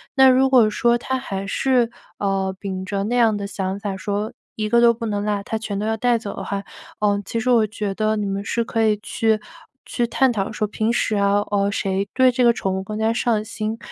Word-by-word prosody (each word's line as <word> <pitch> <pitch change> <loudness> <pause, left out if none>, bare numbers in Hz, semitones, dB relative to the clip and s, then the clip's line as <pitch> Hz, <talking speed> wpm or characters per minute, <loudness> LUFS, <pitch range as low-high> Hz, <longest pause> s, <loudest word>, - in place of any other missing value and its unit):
那 265 -1 +7
如 265 +1 +4
果 240 -5 +5
说 235 +2 +2
他 260 +2 -2
还 195 -6 -5
是， 245 +2 +2 0.3
呃， 195 -1 -1
秉 190 -2 -4
着 195 +1 -2
那 235 +4 -1
样 230 -3 +4
的 200 - -4
想 195 -1 -3
法 200 -2 -4
说， 205 +3 -3 0.2
一 215 -1 -2
个 235 +2 +4
都 235 0 +6
不 230 0 -6
能 205 -1 -2
落， 205 -1 -1
他 220 - -3
全 215 -2 -4
都 210 - -2
要 220 0 0
带 240 +1 +2
走 210 -3 -6
的 - - -6
话， 200 0 -3 0.4
呃， 205 -1 +1
其 230 - -2
实 250 - -1
我 225 -3 +4
觉 210 -2 -3
得 215 +1 +1
你 210 - -1
们 200 0 -3
是 235 - 0
可 225 0 -1
以 215 -1 +3
去 220 -1 +1 0.5
去 240 -1 -1
探 265 +2 +2
讨 205 -2 -2
说 215 0 -1
平 220 +2 -1
时 225 - 0
啊， 200 0 +3
呃， 200 -1 +2
谁 195 0 -1
对 260 -1 +5
这 250 +1 -1
个 235 -1 +6
宠 190 -4 -2
物 190 - -2
更 210 +2 -6
加 220 +1 +2
上 230 -2 +1
心， 220 0 -4
215 Hz, 260 characters per minute, -21 LUFS, 200-235 Hz, 0.5 s, 那